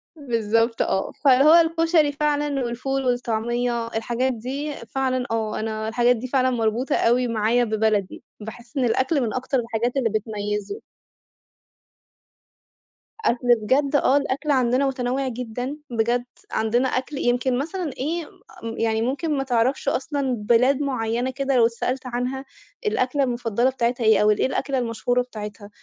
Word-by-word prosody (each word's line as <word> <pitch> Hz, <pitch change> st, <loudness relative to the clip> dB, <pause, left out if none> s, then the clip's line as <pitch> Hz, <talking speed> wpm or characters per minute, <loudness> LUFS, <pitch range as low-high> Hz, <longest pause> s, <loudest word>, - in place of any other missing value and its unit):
بالضبط 230 Hz, -4 st, 0 dB
آه. 190 Hz, -, 0 dB
فهو 275 Hz, +3 st, +6 dB
الكُشري 330 Hz, -2 st, +4 dB
فعلًا 290 Hz, -2 st, 0 dB
والفول 265 Hz, +3 st, -2 dB
والطعمية، 240 Hz, -1 st, -1 dB
الحاجات 235 Hz, +3 st, -1 dB
دي 270 Hz, +6 st, -4 dB
فعلًا 255 Hz, +1 st, -2 dB
آه، 220 Hz, -1 st, -1 dB
أنا 220 Hz, 0 st, -3 dB
الحاجات 240 Hz, +2 st, +3 dB
دي 245 Hz, +2 st, -5 dB
فعلًا 260 Hz, 0 st, +2 dB
مربوطة 235 Hz, +1 st, 0 dB
أوي 245 Hz, +2 st, +2 dB
معايا 230 Hz, +1 st, +2 dB
ببلدي، 215 Hz, -3 st, 0 dB, 0.2 s
باحس 225 Hz, +3 st, -10 dB
إن 260 Hz, -, +2 dB
الأكل 260 Hz, +5 st, +1 dB
من 230 Hz, -3 st, -1 dB
أكتر 260 Hz, +1 st, -1 dB
الحاجات 235 Hz, +2 st, -2 dB
اللي 245 Hz, -4 st, +2 dB
بتميِّزه. 210 Hz, -, -3 dB, 2.4 s
أكْل 245 Hz, +1 st, 0 dB
بجد؟ 275 Hz, +6 st, +1 dB
آه 280 Hz, -1 st, +4 dB
الأكْل 280 Hz, +1 st, -1 dB
عندنا 260 Hz, 0 st, +2 dB
متنوع 260 Hz, 0 st, -1 dB
جدًا 250 Hz, +3 st, -4 dB
بجد، 240 Hz, +1 st, 0 dB, 0.3 s
عندنا 235 Hz, +4 st, +1 dB
أكْل 260 Hz, +3 st, -3 dB
يمكن 245 Hz, 0 st, +1 dB
مثلًا 330 Hz, +1 st, -3 dB
إيه 320 Hz, +5 st, -2 dB, 0.4 s
م 230 Hz, 0 st, -5 dB
يعني 225 Hz, -1 st, +1 dB
ممكن 285 Hz, +5 st, -1 dB
ما 270 Hz, -, 0 dB
تعرفش 255 Hz, +2 st, 0 dB
أصلًا 275 Hz, -1 st, -1 dB
بلاد 245 Hz, +6 st, +3 dB
معيّنة 245 Hz, -2 st, -1 dB
كده 275 Hz, 0 st, -1 dB
لو 235 Hz, -, +5 dB
اتسألت 250 Hz, +3 st, -2 dB
عنها 250 Hz, +2 st, -3 dB, 0.4 s
الأكْلة 280 Hz, -8 st, +1 dB
المفضلة 240 Hz, -1 st, 0 dB
بتاعتها 245 Hz, -2 st, -1 dB
إيه، 220 Hz, 0 st, +5 dB
أو 210 Hz, 0 st, +5 dB
الإيه 210 Hz, -, +1 dB
الأكْلة 270 Hz, 0 st, -2 dB
المشهورة 245 Hz, +1 st, 0 dB
بتاعتها، 210 Hz, -4 st, -8 dB
245 Hz, 140 wpm, -23 LUFS, 230-270 Hz, 2.4 s, فهو